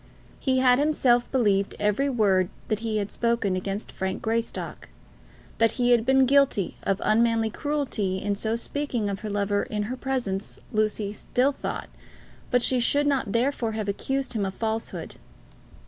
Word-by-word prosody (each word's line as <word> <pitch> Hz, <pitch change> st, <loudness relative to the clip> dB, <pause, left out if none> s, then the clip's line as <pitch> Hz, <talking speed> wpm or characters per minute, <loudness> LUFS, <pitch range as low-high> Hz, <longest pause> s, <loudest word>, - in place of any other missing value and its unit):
He 260 Hz, -1 st, +1 dB
had 255 Hz, 0 st, +5 dB
himself 265 Hz, -5 st, +2 dB
believed 205 Hz, -6 st, +2 dB
every 210 Hz, +7 st, +1 dB
word 195 Hz, -7 st, +2 dB, 0.2 s
that 215 Hz, -, 0 dB
he 225 Hz, -1 st, -2 dB
had 205 Hz, -1 st, -2 dB
spoken 230 Hz, -5 st, 0 dB
against 195 Hz, +3 st, -4 dB
Frank 190 Hz, 0 st, -3 dB
Greystock. 230 Hz, +1 st, -3 dB, 0.7 s
That 225 Hz, -1 st, +4 dB
he 245 Hz, -1 st, +2 dB
had 235 Hz, -1 st, +3 dB
been 265 Hz, 0 st, +5 dB
guilty 275 Hz, -8 st, +3 dB
of 195 Hz, 0 st, 0 dB
unmanly 225 Hz, 0 st, +3 dB
cruelty 265 Hz, -11 st, -1 dB
in 200 Hz, +2 st, -1 dB
so 220 Hz, +2 st, -1 dB
speaking 240 Hz, -3 st, -2 dB
of 195 Hz, -, -4 dB
her 215 Hz, -, -5 dB
lover 205 Hz, 0 st, 0 dB
in 210 Hz, -1 st, -3 dB
her 240 Hz, +5 st, -3 dB
presence, 250 Hz, -7 st, -3 dB
Lucy 215 Hz, -1 st, 0 dB
still 250 Hz, +5 st, +1 dB
thought, -, -, -5 dB, 0.6 s
but 245 Hz, -1 st, +3 dB
she 255 Hz, +1 st, +2 dB
should 285 Hz, +4 st, +2 dB
not 275 Hz, -8 st, +1 dB
therefore 235 Hz, -1 st, 0 dB
have 215 Hz, -1 st, -3 dB
accused 270 Hz, +7 st, -2 dB
him 215 Hz, -3 st, -1 dB
of 190 Hz, -1 st, -3 dB
falsehood. 225 Hz, 0 st, -3 dB
225 Hz, 165 wpm, -26 LUFS, 205-255 Hz, 0.7 s, had